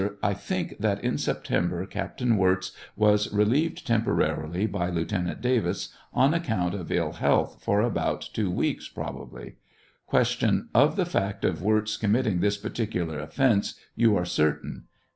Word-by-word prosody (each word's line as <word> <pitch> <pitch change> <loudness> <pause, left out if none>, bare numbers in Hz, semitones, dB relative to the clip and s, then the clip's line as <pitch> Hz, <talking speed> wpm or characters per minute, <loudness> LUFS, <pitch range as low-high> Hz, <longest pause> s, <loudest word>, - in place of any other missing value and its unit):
I 100 - +2
think - - -4
that - - 0
in - - 0
September 85 +1 -1
Captain 120 +4 -1
Wirz 95 -1 +2 0.2
was 105 -1 +3
relieved 125 +11 +1
temporarily 100 -6 0
by 95 -4 -1
Lieutenant 90 +1 -2
Davis 125 -2 0 0.2
on 135 +4 +3
account 110 - 0
of 95 -5 -5
ill - - +1
health, - - +1
for 100 +1 +2
about 120 -1 -1
two 105 -4 0
weeks, 90 - -1
probably. - - -8 0.5
Q. - - +2
Of 145 - +5
the 190 -3 +1
fact 100 - -1
of - - 0
Wirz 110 +2 +1
committing 110 -3 +1
this 100 +2 +1
particular 90 -8 -3
offence 105 - +1 0.2
you 115 -2 +4
are 90 - -1
certain? 75 -3 -1
105 Hz, 145 wpm, -26 LUFS, 90-115 Hz, 0.5 s, Of